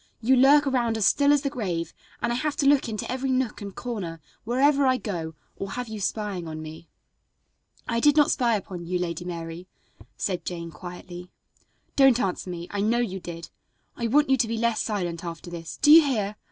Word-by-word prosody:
"You 250 +4 +3
lurk 280 +3 +6
around 240 -4 +1
as 215 - +1
still 285 +10 +4
as 290 -1 +3
the 280 - 0
grave, 180 - -3 0.3
and 240 - +1
I - - -1
have 295 +4 -1
to 280 - 0
look 275 -3 +4
into 215 +1 -4
every 260 +1 -2
nook 255 -4 -1
and 200 -1 -7
corner, 195 -10 -5 0.3
wherever 275 +4 +3
I 255 0 +3
go, 170 -7 -5 0.2
or 195 0 -6
have 250 0 -4
you 220 -1 -6
spying 195 -2 -3
on 155 0 -6
me." 155 +1 -10 1.0
"I 230 - 0
did 295 +4 +4
not 295 - +5
spy 235 -3 +2
upon 180 -4 -6
you, 180 +1 0
Lady 175 0 -3
Mary," 170 0 -6 0.5
said 185 -3 -2
Jane 170 -2 -5
quietly. 180 +1 -9 0.7
"Don't 270 -3 +5
answer 190 -3 -2
me; 175 -1 -6
I 200 - -2
know 225 +3 +2
you 190 -6 -1
did. 170 -2 -8 0.4
I 235 - -2
want 285 +4 +3
you 265 - +5
to 235 -2 +1
be 230 0 -2
less 235 -1 +1
silent 175 -6 -3
after 170 0 -7
this. 165 -1 -7
Do 295 - +7
you 325 +2 +11
hear? 215 -7 -1
215 Hz, 205 wpm, -25 LUFS, 175-255 Hz, 1.0 s, you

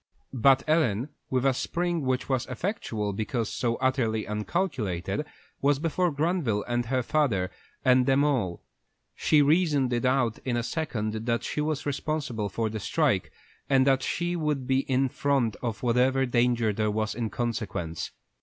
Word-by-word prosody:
But 135 +1 +4
Ellen, 145 -6 +2 0.2
with 130 0 0
a 135 - +4
spring 175 +5 -1
which 130 -1 -1
was 130 -2 0
effectual 125 - -3
because 110 +2 -2
so 115 -2 0
utterly 120 -4 0
uncalculated, 105 - -2 0.3
was 145 0 +3
before 165 +4 +1
Granville 145 - 0
and 120 -1 -1
her 130 0 0
father, 115 -12 +1 0.3
and 125 -1 +5
them 135 +1 +4
all. 120 -12 0 0.5
She 150 -2 +3
reasoned 145 -4 +3
it 120 - 0
out 130 -3 +1
in 125 -2 -1
a 120 - -1
second 110 -7 -3
that 115 0 +1
she 150 - -2
was 155 -1 -2
responsible 140 -7 -2
for 110 +4 -1
the 110 0 -4
strike, - - +1 0.4
and 135 -1 +4
that 135 -1 +3
she 175 +5 -1
would 150 -5 -1
be 130 +1 +2
in 130 +1 +3
the - - -24
front 135 -6 +1
of 115 -3 -4
whatever 130 +2 +3
danger 120 -3 +2
there 105 +1 0
was 110 +1 -1
in 115 -1 -2
consequence. 105 -9 -3
130 Hz, 165 wpm, -27 LUFS, 110-145 Hz, 0.5 s, and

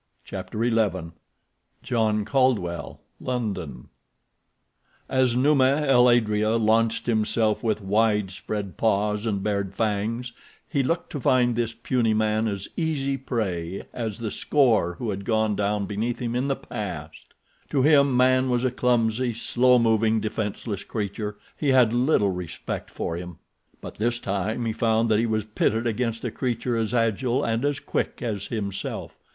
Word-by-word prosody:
Chapter 115 +2 -3
XI 100 -8 0 0.7
John 110 -4 +1
Caldwell, 115 -11 0 0.2
London 95 - -4 1.2
As 130 -2 +2
Numa 140 +2 +3
el 125 -3 +5
adrea 110 -2 +2
launched 115 +1 +2
himself 110 -1 +1
with 110 -3 -1
widespread 105 -1 -1
paws 105 0 +1
and 100 -3 -1
bared 100 -2 -2
fangs 110 +3 -1 0.3
he 140 - 0
looked 165 +6 -1
to 145 - -4
find 125 -1 +3
this 115 -1 -1
puny 115 -1 0
man 110 +1 +1
as 100 -2 -3
easy 145 -5 -1
prey 95 -9 -3
as 115 -4 -4
the 115 -3 -4
score 115 - +2
who 115 +1 -3
had 100 0 -5
gone 110 -1 +1
down 100 0 0
beneath 110 +4 -2
him 120 -1 -3
in 130 +3 0
the 135 - +1
past. 90 - -7 0.3
To 135 - +1
him 140 -3 +5
man 130 +1 +4
was 125 0 +1
a 130 - +1
clumsy, 120 -1 +1
slow 125 +2 +3
moving, 110 -1 +3
defenseless 105 -1 -3
creature—he 105 +6 -4
had 125 -4 +5
little 120 -5 +3
respect 90 -3 -5
for 85 - -4
him. 90 -1 -8 0.4
But - - -9
this 120 +2 +1
time 105 +2 -2
he 110 - -1
found 115 0 +1
that 110 -1 +3
he 115 - +1
was 110 -2 -1
pitted 110 +1 0
against 115 0 -1
a 120 - -2
creature 120 -1 -2
as 110 -1 -1
agile 120 +3 +1
and 115 +2 0
as 145 -1 0
quick - - -3
as 105 -4 -3
himself. 100 -4 -4
115 Hz, 150 wpm, -25 LUFS, 105-125 Hz, 1.2 s, el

